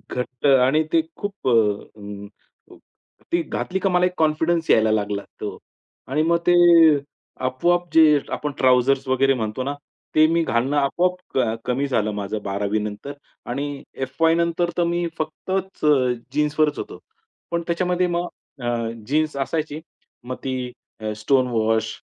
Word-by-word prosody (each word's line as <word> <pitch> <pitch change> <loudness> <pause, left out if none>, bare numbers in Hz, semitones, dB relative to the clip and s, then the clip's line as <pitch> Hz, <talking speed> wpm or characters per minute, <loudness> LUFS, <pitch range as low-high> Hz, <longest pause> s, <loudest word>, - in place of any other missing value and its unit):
घट्ट 125 +1 -4
आणि 135 +3 +4
ते 165 - +5 0.2
खूप 205 -5 -5
अ, - - +4 0.5
अं, 100 0 -8 1.0
ती 170 - +2
घातली 190 +3 -3
का 195 0 +1
मला 180 0 +3
एक 180 - -1
कॉन्फिडन्स 160 +2 +1
यायला 110 0 +4
लागला. 105 -1 -1 0.2
हो. - - -4 0.5
आणि 150 +4 +1
मग 170 +1 +3
ते 175 - +6 0.9
आपोआप 175 +8 +1
जे 155 -2 +6
आपण 150 - -3
ट्राउझर्स 130 +1 +3
वगैरे 135 +1 +3
म्हणतो 110 0 -3
ना, 140 +2 -2 0.4
ते 155 - +7
मी 165 +1 +2
घालणं 130 +1 0
आपोआप 180 +5 0
अ, 115 -4 +1
कमी 130 +3 0
झालं 110 -5 0
माझं 105 +1 -4
12वी 100 +2 -1
नंतर 105 +7 -5 0.4
आणि 140 +2 -4 0.2
एफवाय 160 +5 +2
नंतर 170 +1 0
तर 175 - +3
मी 175 0 0
फक्तच 185 +3 -3 0.5
जीन्सवरच 150 0 +1
होतो. - - -7 0.5
पण 170 0 0
त्याच्यामध्ये 180 +1 +1
मग 175 0 -1 0.3
अ, 120 -1 -1 0.2
जीन्स 155 +1 0
असायची. 150 +2 -2 0.4
मग 130 +1 -5
ती 130 -2 -3 0.3
अ, 110 0 -3
स्टोन 130 +4 +2
वॉश, 110 -1 0
140 Hz, 145 wpm, -22 LUFS, 120-165 Hz, 1.0 s, ते